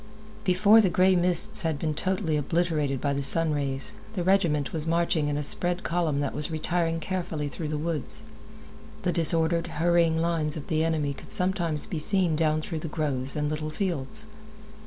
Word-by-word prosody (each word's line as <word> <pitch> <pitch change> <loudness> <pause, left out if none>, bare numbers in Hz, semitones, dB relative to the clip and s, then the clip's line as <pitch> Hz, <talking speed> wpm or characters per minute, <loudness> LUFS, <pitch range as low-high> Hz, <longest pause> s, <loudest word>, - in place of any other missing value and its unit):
Before 205 +3 +5
the 195 - +2
gray 185 +2 +3
mists 180 +4 0
had 160 -3 -1
been 155 +1 -2
totally 185 0 -1
obliterated 150 -2 -1
by 140 +1 -1
the 140 - -2
sun 160 +3 +8
rays, 135 -2 0 0.2
the 180 - -2
regiment 170 -7 +1
was 160 -1 -3
marching 165 -2 +1
in 145 0 -2
a 150 - -2
spread 175 +5 0
column 165 -4 -1
that 140 - -2
was 150 +3 -1
retiring 165 +1 -1
carefully 165 -4 -4
through 155 +2 -6
the 150 0 -3
woods. 155 -2 -4 0.8
The 180 - +1
disordered, 165 0 +1
hurrying 165 0 +2
lines 165 -2 0
of 145 - -9
the 160 -1 +1
enemy 155 -3 -1
could - - -12
sometimes 180 -6 +1
be 165 - -5
seen 180 0 +1
down 155 0 +1
through 160 0 -5
the 165 - -6
groves 140 -4 -2
and 150 -1 -1
little 155 +1 -3
fields. 185 +3 -4
160 Hz, 180 wpm, -26 LUFS, 150-175 Hz, 0.8 s, sun